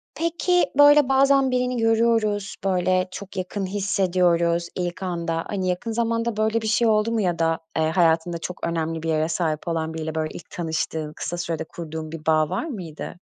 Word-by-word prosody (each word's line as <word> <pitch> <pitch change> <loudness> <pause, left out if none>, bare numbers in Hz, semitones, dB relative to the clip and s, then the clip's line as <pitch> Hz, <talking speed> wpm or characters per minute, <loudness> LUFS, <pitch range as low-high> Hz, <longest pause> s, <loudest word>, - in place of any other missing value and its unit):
Peki, 340 +2 +1
böyle, 290 -1 +7
bazen 270 0 +4
birini 250 0 0
görüyoruz, 225 -3 +1
böyle, 185 -1 +1
çok 200 +1 -9
yakın 190 +2 -3
hissediyoruz 180 -3 +1
ilk 180 +1 -3
anda. 170 -2 -2
Hani, 190 -3 -2
yakın 180 +6 -2
zamanda 230 0 -1
böyle 220 +1 +1
bir 220 - -3
şey 220 +2 +3
oldu 215 +1 +2
mu 230 -1 +1
ya 175 -4 0
da, 165 0 +1 0.2
eee, 160 - +2
hayatında 165 0 +2
çok 170 +1 -5
önemli 165 -1 -2
bir 165 - -2
yere 155 0 +1
sahip 160 -1 -2
olan 160 -1 -2
biriyle, 160 0 -4
böyle, 155 -1 -1
ilk - - -10
tanıştığın, 160 -2 -3
kısa 175 - -4
sürede 170 -2 -3
kurduğun 160 -1 -7
bir 160 -2 -8
bağ 155 -1 +3
var 185 - -2
mıydı? 175 - -7
180 Hz, 180 wpm, -23 LUFS, 165-225 Hz, 0.2 s, böyle